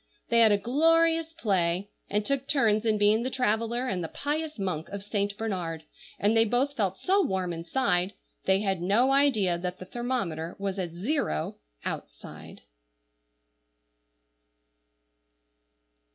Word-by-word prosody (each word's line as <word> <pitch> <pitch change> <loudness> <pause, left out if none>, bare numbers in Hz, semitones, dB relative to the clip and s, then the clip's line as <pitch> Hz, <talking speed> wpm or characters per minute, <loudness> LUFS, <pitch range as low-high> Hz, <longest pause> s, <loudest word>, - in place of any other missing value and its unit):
They 235 - +4
had 225 -2 +7
a 205 - +4
glorious 325 +7 +3
play, 195 - 0 0.2
and 210 0 0
took 275 +1 -1
turns 225 -6 +3
in 215 -1 +3
being 210 +2 +4
the 255 - -1
traveller 235 0 0
and 180 -6 -2
the - - -3
pious 300 - -3
monk 180 -6 -3
of 200 -1 -6
Saint 205 -1 -2
Bernard; 175 -7 -3 0.3
and 210 +3 +2
they 225 - +6
both 250 +6 0
felt 195 -5 0
so 390 - +2
warm 185 - -1
inside, 180 +2 0 0.3
they 190 +1 +3
had 195 -4 -1
no 220 +9 +3
idea 220 -11 +3
that 180 +1 -4
the 185 - -9
thermometer 185 -8 -3
was 195 -1 -3
at 180 -2 -2
zero 180 - -2 0.3
outside. - - -7
210 Hz, 140 wpm, -28 LUFS, 185-255 Hz, 0.3 s, had